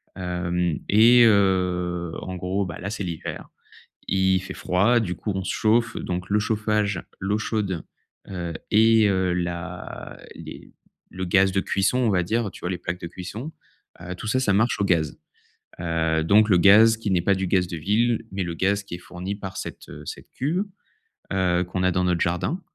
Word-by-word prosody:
hem 90 -2 -2
et 120 +4 +7
heu, 90 -4 +2
en 95 - -6
gros, 95 +2 -2
bah, 85 -3 -7
là, 100 - -4
c'est 105 - -4
l'hiver. 85 -3 -6 0.6
Il 95 -1 +2
fait 95 - -7
froid, 100 +7 +2
du 90 -5 -3
coup 105 - -4
on 95 - -2
se - - -2
chauffe, 115 +1 +2
donc 90 +1 -4
le 105 +1 +3
chauffage, 105 -3 0 0.2
l'eau 100 +2 0
chaude, 100 -6 -2 0.5
heu 85 -3 -4 0.2
et 110 0 +5
heu, 95 -2 +1
la 90 0 -5 0.2
les - - -10 0.4
le 95 - -5
gaz 95 +2 +3
de 95 - +2
cuisson, 100 +7 +1
on 120 -3 +2
va 95 -3 +2
dire, 110 +2 -1
tu - - -12
vois, 90 - -3
les 95 - -2
plaques 90 0 -4
de 85 - -6
cuisson, 100 - -7 0.5
heu, 90 +1 -6
tout 100 - -7
ça 130 +5 +1
ça 100 -6 +2
marche 110 +5 +2
au - - +2
gaz, 80 -5 +1 0.6
heu, 80 -1 0
donc, 105 +5 +5
le 95 - +6
gaz 110 +5 +7
qui 110 -2 -3
n'est 90 -2 +3
pas 100 - +3
du 95 0 -2
gaz 90 0 +2
de 85 - -5
ville 115 +6 +1
mais 95 0 -2
le 85 - -4
gaz 100 +4 +1
qui 100 - -8
est - - -13
fourni 90 +2 -6
par 95 -2 -7
cette - - -8 0.2
cette - - -8
cuve, 165 +9 -1 0.7
heu, 90 -2 +2
qu'on 90 +1 -3
a 90 - +4
dans 90 +1 0
notre 90 -1 +1
jardin 90 - -1
95 Hz, 195 wpm, -24 LUFS, 90-105 Hz, 0.7 s, et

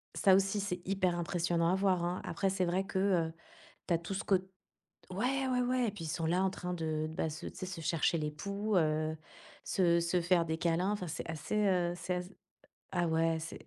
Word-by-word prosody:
ça 190 - +5
aussi, 195 +1 +2
c'est 180 -3 -3
hyper 185 -2 +1
impressionnant 170 0 +1
à 185 - +3
voir, 190 -2 +2
hein. 175 +1 -1
Après, 190 +3 0
c'est 185 -1 +1
vrai 185 +3 0
que, 190 - -4
heu, 175 -5 +2 0.5
tu 175 - +2
as - - +2
tout 170 +4 -6
ce 195 - -2
côt 195 - +4 0.7
ouais, 260 +7 0
ouais, 250 -1 +2
ouais 250 -1 +1
et - - +1
puis 185 -5 -7
ils 160 - -4
sont 165 +1 -1
là 180 +3 +2
en 190 - +2
train 180 -1 -4
de 155 -2 -1
de 160 - -8
bah 160 - -1
se 155 - -7
tu - - -7
sais, - - -5
se 180 -2 -6
chercher 165 +1 +1
les 150 -1 -1
poux, 200 +6 -3
heu, 155 -1 +1 0.5
se 170 -2 +3
se 170 +1 +1
faire 170 0 +3
des 160 0 -2
câlins, 170 +3 +1
enfin 195 -4 -3
c'est - - -5
assez, 165 +6 -3
heu 175 -2 +2
c'est 180 +1 -2
ass 180 +1 -5 0.7
ah 175 -1 +2
ouais, 165 0 +2
c'est 165 +1 -8
180 Hz, 235 wpm, -33 LUFS, 165-195 Hz, 0.7 s, ça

